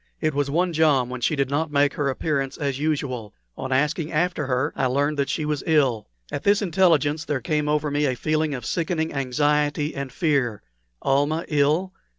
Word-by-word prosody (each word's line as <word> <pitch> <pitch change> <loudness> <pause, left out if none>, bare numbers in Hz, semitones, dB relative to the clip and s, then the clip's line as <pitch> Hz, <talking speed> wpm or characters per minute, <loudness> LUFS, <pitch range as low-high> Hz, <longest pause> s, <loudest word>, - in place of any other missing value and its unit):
It 155 -1 0
was 140 0 0
one 175 +4 +1
jom 145 -6 +3
when 125 -1 -5
she 150 - +1
did 140 -1 -1
not 155 +2 0
make 145 0 +3
her 145 -2 -1
appearance 135 0 -2
as 140 -2 -2
usual. 140 -8 -2 0.2
On 130 - -5
asking 150 +4 0
after 160 -2 0
her 130 +3 0
I 130 - +1
learned 145 +3 0
that 140 - 0
she 155 - -1
was 150 -2 -1
ill. 135 -9 +2 0.2
At - - -3
this 205 +1 +3
intelligence 165 -4 +2
there 145 -4 -2
came 150 -2 -1
over 150 -1 0
me 145 +1 +1
a 130 - 0
feeling 155 +3 0
of 125 -3 -7
sickening 160 0 -1
anxiety 145 +2 0
and 135 -1 -5
fear. 135 - 0 0.4
Almah 145 +4 +1
ill! 155 +6 +1
145 Hz, 190 wpm, -24 LUFS, 135-155 Hz, 0.4 s, jom